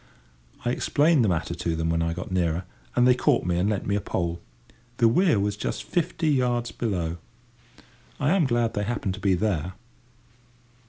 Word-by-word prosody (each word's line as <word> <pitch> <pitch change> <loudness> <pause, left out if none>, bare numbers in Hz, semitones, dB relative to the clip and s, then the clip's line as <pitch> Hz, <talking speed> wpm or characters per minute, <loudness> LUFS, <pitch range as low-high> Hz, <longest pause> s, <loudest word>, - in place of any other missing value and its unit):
I 120 - +2
explained 145 +2 +3
the 105 - +2
matter 85 -1 -1
to 85 -1 -2
them 80 0 -1
when 85 0 +1
I 85 0 0
got 90 +1 -6
nearer, 85 -1 0 0.3
and 125 - +4
they 125 - +7
caught 125 - +1
me 90 -1 0
and 95 +4 +1
lent 105 -3 -2
me 100 - 0
a 105 - 0
pole. 85 -2 -2 0.6
The 115 - +5
weir 160 - +3
was 100 0 0
just - - -4
fifty 170 -2 -1
yards 120 -4 +1
below. 90 -8 -2 1.0
I 145 +1 +2
am 180 -6 +3
glad 120 -2 +1
they 105 0 -1
happened 105 -4 -2
to 100 - -8
be 100 -1 +2
there. 90 -3 -1
105 Hz, 190 wpm, -25 LUFS, 85-125 Hz, 1.0 s, they